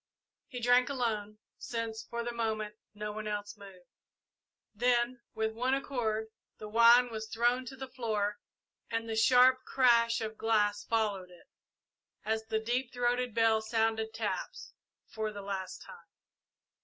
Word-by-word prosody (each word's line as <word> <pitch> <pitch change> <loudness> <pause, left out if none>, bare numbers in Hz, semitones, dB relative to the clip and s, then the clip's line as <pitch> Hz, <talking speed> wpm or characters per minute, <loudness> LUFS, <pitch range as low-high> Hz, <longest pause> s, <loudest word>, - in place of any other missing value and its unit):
He 250 -4 -6
drank 245 +2 +4
alone, 215 -6 -2 0.2
since, 230 -2 -4
for 235 0 -5
the 240 - -3
moment, 220 -2 -2 0.2
no 210 0 -4
one 215 0 -6
else 205 -1 -4
moved. 195 -3 -14 0.9
Then, 240 +2 +1
with 220 0 -1
one 250 +4 +1
accord, 220 -5 -2 0.3
the 215 - -8
wine 235 +3 +6
was 220 0 -5
thrown 240 +3 +1
to 265 - -7
the 265 0 -7
floor 220 -5 -2 0.5
and 230 0 -2
the 225 - -3
sharp 255 +3 +5
crash 235 -2 +3
of 220 -1 -5
glass 210 -2 +1
followed 205 -5 -1
it, 175 -1 -18 0.8
as 220 0 0
the 220 0 -1
deep 240 +3 -1
throated 245 -1 0
bell 225 -1 +3
sounded 220 0 0
taps - - -4 0.3
for 220 -1 -4
the 205 -1 -8
last 195 -1 -5
time. 480 -1 -13
225 Hz, 145 wpm, -31 LUFS, 215-245 Hz, 0.9 s, wine